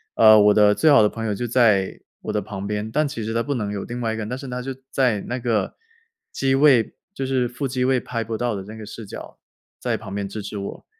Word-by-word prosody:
呃， 110 -1 +8
我 105 0 +6
的 105 -1 +5
最 155 - +3
好 140 -7 +7
的 105 - +4
朋 115 0 -5
友 105 - -1
就 120 - -3
在 110 -6 +2 0.2
我 - - -3
的 105 - 0
旁 95 0 -6
边， 105 +1 -3
但 150 +1 +1
其 140 -6 -5
实 110 +1 -3
他 115 - +1
不 145 - -2
能 105 -3 -2
有 100 -2 -4
另 120 +1 -6
外 110 -1 -1
一 - - -4
个 - - -5
人， 105 - -4
但 125 - -2
是 135 -1 -8
他 125 0 -4
就 135 0 -5 0.2
在 125 -7 +1
那 125 - -4
个 115 -3 -1 0.6
机 135 0 +1
位， 135 -5 +4 0.2
就 135 - -4
是 130 -2 +1
副 130 +3 -4
机 125 0 -1
位 130 -1 +3
拍 115 -2 -4
不 110 0 -4
到 120 -1 -1
的 95 - -5
那 105 +3 -10
个 110 - -9
视 110 +1 -9
角， - - -10 0.4
在 - - -1
旁 100 +1 -7
边 100 -1 -2
支 105 +2 -6
持 105 - -6
我。 100 - -7
115 Hz, 295 characters per minute, -22 LUFS, 105-125 Hz, 0.6 s, 呃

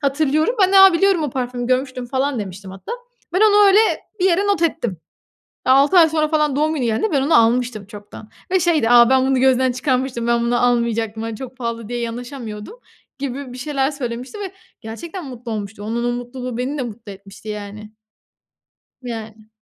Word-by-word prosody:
Hatırlıyorum. 305 - +1
Ben 375 - +3
de, 390 - +7
"Aaa, 385 -1 +9
biliyorum, 380 -1 +2
o 295 - -2
parfümü 245 -1 -3
görmüştüm," 255 -1 -1
falan 265 +1 -1
demiştim 195 -1 -7
hatta. 190 - -8 0.4
Ben 370 - +1
onu 415 -1 +6
öyle 395 +1 +6 0.4
bir 365 - +2
yere 380 +2 +2
not 400 -5 +1
ettim. 295 - -1 0.7
6 280 +7 +5
ay 325 - +7
sonra 310 -1 0
falan 300 -3 +1
doğum 310 +2 +1
günü 270 - -2
geldiğinde 235 - 0
ben 275 - +2
onu 295 +4 +1
almıştım 230 -2 +1
çoktan 205 +1 -12 0.2
ve 375 0 +2
şeydi, 320 -9 +2
"Aaa, 240 0 +7
ben 260 0 +3
bunu 265 -1 +2
gözden 260 -1 +3
çıkarmıştım, 255 -2 -1
ben 235 0 +2
bunu 240 +1 +1
almayacaktım, 230 -2 -1
hani, 225 -1 -5
çok 260 +1 -9
pahalı 230 -3 -5
diye 240 0 -3
yanaşamıyordum," 235 - -6 0.4
gibi 275 -1 -5
bir 250 - -9
şeyler 275 +1 -1
söylemişti 255 - -6
ve 390 -2 -5 0.3
gerçekten 320 - -8
mutlu 245 -3 -7
olmuştu. 205 -1 -6
Onun 230 +3 -3
o 240 - 0
mutluluğu 245 0 -6
beni 270 +4 -3
de - - -1
mutlu 225 -3 -8
etmişti 200 +2 -13
yani. 210 0 -7 1.1
Yani. 220 -3 -8
250 Hz, 185 wpm, -20 LUFS, 230-295 Hz, 1.1 s, Aaa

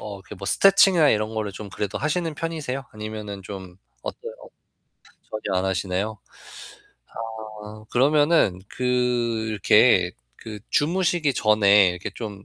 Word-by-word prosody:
어 100 -2 -7 0.2
뭐 - - -8
스트레칭이나 195 -5 +5
이런 110 +1 -1
거를 105 -2 -3
좀 105 +1 -8
그래도 105 +1 -4
하시는 160 +2 -1
편이세요? 145 -5 -4
아니면은 105 -2 -7
좀 95 -2 -9 0.3
어때요? 470 0 -7 1.0
전혀 105 -3 -3
안 95 - -2
하시네요? 95 +3 -2 1.5
아 110 +1 -11
그러면은 145 - +3
그 - - -8 0.7
이렇게 105 -2 +4 0.3
그 110 -2 -8
주무시기 165 -2 +1
전에 105 -3 +5
이렇게 90 0 -6
좀 105 -4 -7
110 Hz, 280 characters per minute, -23 LUFS, 100-145 Hz, 1.5 s, 스트레칭이나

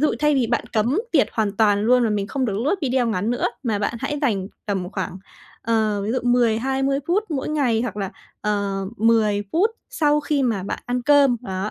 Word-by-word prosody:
dụ 305 - +2
thay 300 -1 +3
vì 255 -4 +2
bạn 235 - 0
cấm 240 - +1
tiệt 295 - +4
hoàn 210 -2 -1
toàn 205 -2 +3
luôn 250 +2 +4
và 220 - +1
mình 200 -1 -1
không 265 +2 -2
được 205 -3 -1
lướt 305 - +2
video 255 -2 +1
ngắn 215 0 -1
nữa, 245 - -1 0.2
mà 220 -5 -1
bạn 210 +3 -1
hãy 290 +2 -2
dành 200 -8 0 0.2
tầm 190 -2 -2
khoảng, 190 -1 -4 0.4
ờ, 220 -2 +1
ví 215 - -2
dụ 255 - +1
10-20 250 +3 +1
phút 400 +5 +1
mỗi 275 -1 -2
ngày 255 -7 +1
hoặc 220 -5 -4
là, 195 -2 -3 0.3
ờ, 200 -2 -1
10 215 -2 +2
phút 400 +7 +3 0.2
sau 300 -1 +2
khi 290 -2 0
mà 220 -7 0
bạn - - -4
ăn 245 0 -1
cơm, 280 -3 +5
đó, 190 0 -3
230 Hz, 215 wpm, -22 LUFS, 205-270 Hz, 0.4 s, cơm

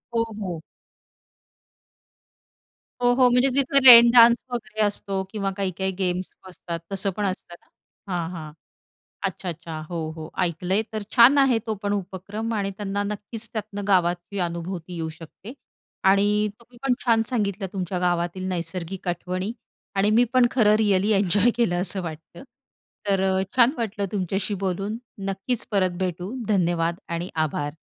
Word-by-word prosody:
हो, 230 - +3 0.2
हो. 175 -4 -4 2.4
हो, 245 0 +4
हो. 250 -1 +5
म्हणजे 250 +2 +3
तिथं 275 0 +2
रेन 235 -1 +11
डान्स 235 0 +8
वगैरे 215 -2 -4
असतो, 195 -1 -2
किंवा 200 -3 -2
काही-काही 190 0 -2
गेम्स 180 0 -2 0.2
असतात, 170 -2 -6
तसं 195 +1 +1
पण 210 - 0
असतं 185 -2 -4
ना. - - -32 0.5
हां, 170 -1 -2
हां. 155 -3 -7 0.8
अच्छा. 185 - -5
अच्छा. 165 -1 -6
हो, 170 -2 -4 0.2
हो, 155 0 -8
ऐकलंय, 180 +4 0
तर 215 -1 -3
छान 250 +5 +7
आहे 265 -4 +4
तो 220 - -1
पण 205 0 -1
उपक्रम. 205 +3 -4
आणि 200 -1 -1
त्यांना 205 0 -2
नक्कीच 210 +2 -5
त्यातनं 210 -2 -5
गावात 175 -2 +3 0.2
ही 200 - -4
अनुभूती 170 +1 -6
येऊ 160 -1 -3
शकते. 185 +8 -11 0.5
आणि 205 +2 +3
तुम्ही 240 +1 -19
पण 265 -2 +2
छान 225 -2 +4
सांगितलं 205 -5 -1
तुमच्या 185 -1 -3
गावातील 175 +1 -1
नैसर्गिक 180 +1 -4
आठवणी. 185 +4 -3 0.4
आणि 200 +2 +3
मी 245 - +6
पण 255 -1 +5
खरं 215 -4 +4
रिअली 205 -1 +2
एन्जॉय 200 +3 +3
केलं, 175 -7 +1
असं 190 0 -2
वाटतं. 165 +1 -9 0.7
तर 195 -1 +2
अ, 190 0 +1
छान 240 0 +6
वाटलं 210 -3 -2
तुमच्याशी 195 +1 -1
बोलून. 195 +4 -2 0.3
नक्कीच 195 +5 -2
परत 190 -3 +2
भेटू. 185 +4 -3
धन्यवाद 170 -3 +1
आणि 170 +1 -3 0.2
आभार. 145 -1 -3
195 Hz, 150 wpm, -24 LUFS, 180-220 Hz, 2.4 s, रेन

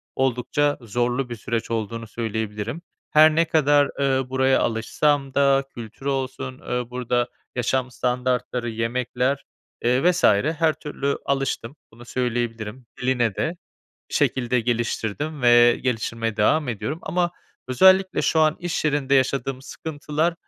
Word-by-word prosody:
oldukça 135 +3 +1
zorlu 120 +3 -1
bir 120 - -4
süreç 115 +1 -3
olduğunu 115 0 -3
söyleyebilirim. 110 +4 -4 0.3
Her 155 0 +6
ne 165 +1 +4
kadar, 145 -3 +3
ııı, 135 -2 +1
buraya 130 0 +3
alışsam 135 +5 0
da 140 0 +3
kültürü 120 +3 -7
olsun, 130 -1 -3
ııı, 125 -1 -3
burada 125 -1 -1 0.3
yaşam 125 +1 0
standartları, 125 -1 -1
yemekler, 125 +4 -1 0.4
ııı, 130 +9 +4
vs. 180 0 -3
her 155 +9 +3
türlü 140 -2 -3
alıştım. 135 -2 -2 0.2
Bunu 120 +2 -14
söyleyebilirim. 120 -1 -3 0.2
Diline 120 -5 +1
de 170 +3 -2 0.5
bir - - -5
şekilde 125 -1 +1
geliştirdim 120 +5 -2
ve 120 0 +6
geliştirmeye 115 -2 -2
devam 140 +7 +2
ediyorum 115 +7 -3
ama 175 -1 0 0.4
özellikle 190 +7 +4
şu 160 - +2
an 155 -1 +3
iş 175 -2 -2
yerinde 145 -2 +1
yaşadığım 130 0 +1
sıkıntılar, 155 +3 -2
130 Hz, 130 wpm, -23 LUFS, 120-145 Hz, 0.5 s, Her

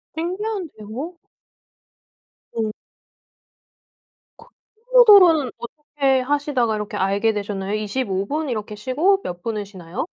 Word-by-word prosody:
신기한데요? 340 - -4 1.4
음. 215 -1 -1 1.7
크 460 - -15 0.5
포모도로는 380 - +7
어떻게 275 0 -1
하시다가 270 -4 0
이렇게 210 0 -4
알게 200 +3 +1
되셨나요? 200 -1 -4
25 210 -2 -2
분 300 +1 -2
이렇게 215 -2 -4
쉬고 305 - +1
몇 175 0 -6
분을 215 -3 -3
쉬나요? 185 - -6
245 Hz, 235 characters per minute, -22 LUFS, 210-310 Hz, 1.7 s, 포모도로는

